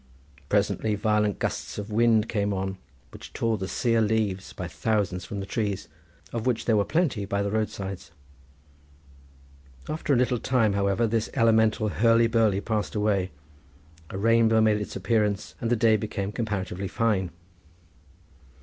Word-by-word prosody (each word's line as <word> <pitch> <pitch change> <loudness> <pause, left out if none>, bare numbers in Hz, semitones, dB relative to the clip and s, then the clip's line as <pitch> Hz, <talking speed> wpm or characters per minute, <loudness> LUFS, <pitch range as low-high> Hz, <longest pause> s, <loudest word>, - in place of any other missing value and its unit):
Presently 110 -1 +1
violent 105 -1 +1
gusts - - -3
of 105 +1 -6
wind 115 0 +3
came 100 -2 -1
on, 95 0 -3 0.3
which - - -11
tore 115 -2 0
the 95 - -3
sear 115 +1 +1
leaves 105 -3 0
by 90 - -6
thousands 90 +2 -1
from 100 -2 -5
the - - -5
trees 100 -2 -2 0.5
of 115 +1 -2
which 120 -3 0
there 115 - +3
were 105 - +3
plenty 155 - 0
by 100 0 -1
the 100 - -2
roadsides. 100 -3 -3 1.8
After 155 -1 -2
a - - +3
little 125 -1 +1
time, 115 -5 +2
however, 100 +3 +1
this 115 0 -1
elemental 110 -3 +3
hurly 115 +3 +4
burly 110 -4 +2
passed 110 -1 -2
away, 105 -3 +1 0.8
a - - -6
rainbow 115 +1 +4
made 110 -1 +3
its 105 - -6
appearance 105 -8 0
and 115 - -1
the 120 - +3
day 110 -1 +4
became 100 -1 -4
comparatively 100 -4 -3
fine. 100 -3 0
105 Hz, 150 wpm, -26 LUFS, 100-115 Hz, 1.8 s, hurly